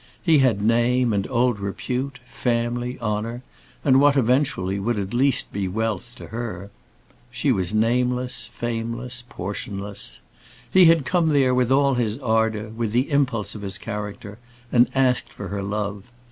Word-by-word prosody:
He 160 -5 +5
had 115 -7 +2
name, 120 +1 +3
and 100 -1 -1
old 125 -3 +1
repute, 125 +7 -3
family, 120 +1 -2
honour, 115 +2 -3 0.4
and 135 -2 +6
what 145 0 +5
eventually 120 -7 +1
would 115 +3 -1
at 100 +1 -3
least 135 +1 +2
be 100 -1 -1
wealth 110 +3 -2
to - - -10
her. 105 -5 -5 0.6
She - - 0
was 95 +2 0
nameless, 125 +1 0
fameless, 120 +1 -4
portionless. 100 +1 -5 0.5
He 185 -1 +7
had 165 -4 +5
come 175 -1 +2
there 135 -4 +3
with 125 0 +2
all 140 0 +4
his 115 -3 0
ardour, 110 -4 0
with 110 -1 -3
the 130 +6 +1
impulse 130 -7 +1
of 105 - -8
his 100 0 -4
character, 105 +1 -6 0.3
and 120 -1 +5
asked 130 -2 +2
for 100 - -7
her 100 0 -3
love. 100 +2 -4
120 Hz, 155 wpm, -23 LUFS, 105-125 Hz, 0.6 s, He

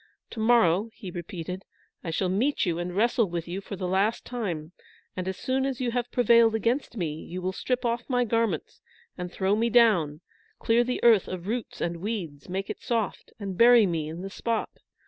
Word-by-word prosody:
To 230 - -7
morrow," 220 -3 +4
he 190 -6 -8
repeated, 175 +1 -6 0.4
"I 170 - -4
shall 175 +3 0
meet 230 +11 +1
you 170 -2 -1
and 175 0 -4
wrestle 230 0 +2
with 170 -1 -4
you 185 +3 -4
for 200 - -7
the 185 -1 -3
last 195 +5 +1
time; 180 -10 -4 0.4
and, 185 0 -4
as 190 - -3
soon 260 +1 0
as 270 -2 -2
you 250 -2 0
have 245 0 -1
prevailed 235 -2 +5
against 235 +3 -1
me, 165 -6 -1
you 180 - -6
will 185 +1 -2
strip 250 +5 -2
off 235 +2 -1
my 245 -1 +2
garments 225 -8 -1 0.3
and 180 -1 -6
throw 195 +2 +1
me 230 +2 +1
down, 180 -11 +4 0.4
clean 235 +1 +2
the 250 - -2
earth 225 -5 +6
of 180 -1 -6
roots 230 +2 -4
and 170 0 -1
weeds, 175 -7 -5
make 195 +2 -3
it - - -6
soft, 230 -5 -2
and 195 -3 -5
bury 235 -1 +8
me 160 -4 -2
in 165 +3 -7
the 195 - -6
spot. 230 +2 -2
200 Hz, 205 wpm, -27 LUFS, 180-235 Hz, 0.4 s, bury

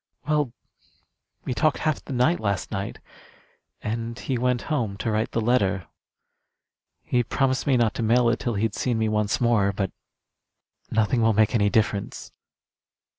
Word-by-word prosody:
Well, 150 -4 +1 0.9
we - - -1
talked 150 0 +2
half 155 -3 -1
the - - -9
night 130 +7 +2
last 100 -3 -2
night, 95 +1 -4 0.9
and 115 +2 -3
he 130 - -3
went 125 0 0
home 115 -10 -2
to 110 - -2
write 110 +1 0
the - - -1
letter. 100 -6 +1 1.2
He 125 - +1
promised 130 +2 0
me 135 -3 +4
not 115 -3 +2
to - - -4
mail 120 +2 +3
it 115 - 0
till 120 -3 -2
he'd 105 +1 0
seen 120 +2 -1
me 110 -1 +1
once 105 -1 0
more; 115 -5 +3
but 95 -1 -2 1.0
nothing 110 +2 +1
will 110 0 +4
make 110 +3 +3
any 105 -3 +3
difference." 105 -2 -1
115 Hz, 160 wpm, -25 LUFS, 105-125 Hz, 1.2 s, me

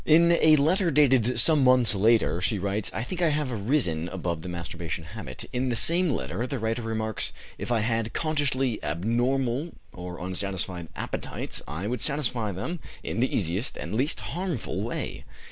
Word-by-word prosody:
In 170 +2 +6
a 160 -2 +6
letter 170 +5 +3
dated 130 -5 +4
some 150 +3 +5
months 125 -3 +5
later, 105 -3 +3
she 105 +3 +1
writes: 100 +2 -1
"I 110 - -3
think 180 +8 -5
I 170 - +4
have 150 -3 0
risen 100 - 0
above 85 -3 -3
the 90 - -6
masturbation 85 -1 -5
habit." 105 +8 -8
In 125 +1 0
the 120 - 0
same 170 +8 +3
letter 95 - -2
the 135 - -3
writer 115 +1 -1
remarks: 110 -1 -2 0.3
"If - - -4
I 115 -2 +3
had 115 0 0
consciously 135 -6 0
abnormal 120 - 0 0.2
or 90 0 -7
unsatisfied 90 -1 -3
appetites - - -4
I 80 +6 -4
would 120 +1 -2
satisfy 125 -7 0
them 135 - -4 0.2
in - - -3
the 130 - +2
easiest 95 +5 -1
and - - -5
least 130 +7 0
harmful 175 - -3
way." - - -4
115 Hz, 170 wpm, -27 LUFS, 95-140 Hz, 0.3 s, In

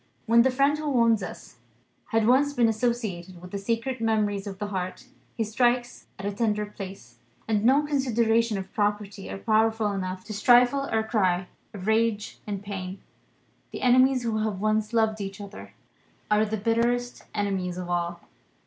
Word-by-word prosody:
When 235 0 +6
the 260 - +4
friend 280 +3 +2
who 305 -1 -2
wounds 230 -5 +3
us 175 -7 -8 0.5
has 225 -1 +1
once 275 +5 +4
been 240 -4 +3
associated 215 -6 -2
with 180 +1 -11
the 200 - -3
sacred 230 +4 -2
memories 210 -3 0
of 195 -1 -6
the 205 +1 -4
heart, 185 +4 -4 0.3
he 225 - +1
strikes 240 +2 0
at 195 - -7
a 205 - 0
tender 210 0 0
place, 195 -2 -10 0.3
and 215 -2 +1
no 270 +5 +5
considerations 230 -6 +1
of 190 0 -7
propriety 205 -1 -2
are - - -5
powerful 220 0 +2
enough 185 -1 -4
to 215 - -7
stifle 245 +5 +4
our 220 0 +2
cry 190 -5 +1 0.3
of 190 -3 -8
rage 220 -1 0
and 200 -1 -4
pain. 190 -2 -5 0.7
The - - -7
enemies 255 +1 +4
who 225 -2 -1
have 215 -3 -2
once 215 +1 0
loved 220 -2 +1
each 195 0 -6
other 205 0 -10 0.6
are 210 +1 +4
the 220 +1 -2
bitterest 235 +3 0
enemies 190 -3 -1
of 180 -1 -5
all. 175 -1 -2
215 Hz, 170 wpm, -26 LUFS, 200-235 Hz, 0.7 s, When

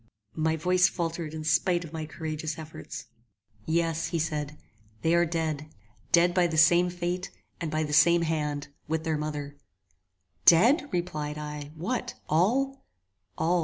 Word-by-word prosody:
My 160 0 +1
voice 180 +3 +3
faltered 165 -2 -3
in 155 0 -6
spite 170 +3 +2
of 160 - -12
my 160 -1 -4
courageous 155 -1 -4
efforts. 160 -1 -8 0.6
"Yes," 165 0 +1 0.2
said 150 -2 -2
he, 150 - -16 0.5
"they 165 - +3
are 170 0 +4
dead! 160 -3 -2 0.4
Dead 175 +1 +5
by 180 -1 +3
the 160 -1 -3
same 175 +3 +6
fate, 180 +1 -3 0.3
and 165 - -3
by 155 +1 0
the 150 -1 -4
same 170 +3 +5
hand, 150 -3 -2 0.2
with 160 +1 -1
their 160 -2 -1
mother!" 145 -1 -4 0.9
"Dead!" 245 - +6
replied 155 -5 -3
I; 150 -1 -6
"what, 220 +10 -3
all?" 260 - +1 0.5
"All!" 175 +2 +2
160 Hz, 150 wpm, -28 LUFS, 155-175 Hz, 0.9 s, same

